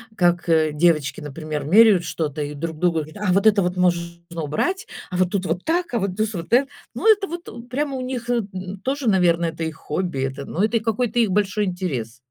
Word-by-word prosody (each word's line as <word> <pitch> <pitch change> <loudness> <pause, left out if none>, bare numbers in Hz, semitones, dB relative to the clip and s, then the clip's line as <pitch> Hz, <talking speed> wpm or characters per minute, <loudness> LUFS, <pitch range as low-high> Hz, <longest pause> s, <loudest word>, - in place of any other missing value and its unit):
как, 175 -2 +2
э, 160 -2 +3
девочки, 155 -3 +2
например, 150 0 -5
меряют 200 +1 +6
что-то 155 -3 -3
и 145 0 -5
друг 160 +2 -5
другу: 165 -1 +1
"А 205 -3 0
вот 195 +3 +4
это 205 -2 +5
вот 180 +1 -1
можно 170 -1 0 0.2
убрать, 370 - -1 0.2
а 180 - -3
вот 185 -1 +2
тут 195 -2 -1
вот 175 +3 -2
так, 340 -2 0
а - - +2
вот 195 -2 -2
тус 215 +1 -1
вот 170 +6 -5
э". 270 +3 +5 0.3
Ну, 445 - +5
это 415 -2 +2
вот 310 -9 -8
прямо 275 +2 -2
у - - -4
них, 250 -2 -4
н, 195 -5 -3
тоже, 265 -2 0
наверно, 175 -3 +3
это 165 0 -3
их 160 -1 -3
хобби, 165 -2 -3
это, 135 +1 -3
но 185 - -1
это 225 +2 +2
их 220 - -4
какой-то 230 +1 -1
их 220 -5 +3
большой 205 +1 +1
интерес. 155 - -3
185 Hz, 220 wpm, -22 LUFS, 165-225 Hz, 0.3 s, меряют